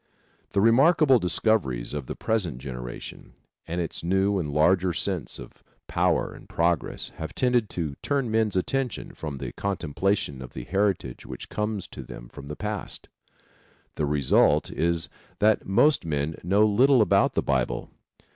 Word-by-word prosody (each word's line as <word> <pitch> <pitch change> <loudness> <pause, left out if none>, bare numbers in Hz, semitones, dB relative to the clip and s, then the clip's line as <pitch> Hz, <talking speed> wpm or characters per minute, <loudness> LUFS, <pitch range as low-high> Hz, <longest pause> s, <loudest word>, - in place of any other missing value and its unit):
The 100 - +3
remarkable 135 - +5
discoveries 85 - 0
of 70 -4 -4
the - - -4
present 95 - -1
generation 60 -2 -8 0.3
and 85 +2 -3
its 85 - -4
new 95 +3 +2
and 75 -5 -3
larger 90 +4 +3
sense - - -2
of - - -12 0.2
power - - +1
and - - -14
progress 85 -2 0
have 80 -1 -6
tended 125 -4 +2
to 80 -5 -3
turn 135 -5 0
men's 110 -3 +1
attention 125 +7 -1
from 75 -3 -6
the - - -5
contemplation 95 -5 -1
of 65 - -9
the 65 - -6
heritage 95 -7 -1
which - - -8
comes 105 -2 -2
to - - -8
them - - -10
from 70 - -11
the 75 - -5
past. 105 0 -4 0.8
The 75 - -1
result 70 -2 +3
is 85 0 0 0.3
that 110 +1 +3
most 145 +10 +4
men 75 0 -2
know 100 +4 +4
little 125 +4 +5
about - - +3
the - - +1
Bible. 65 -3 -1
90 Hz, 155 wpm, -26 LUFS, 75-110 Hz, 0.8 s, remarkable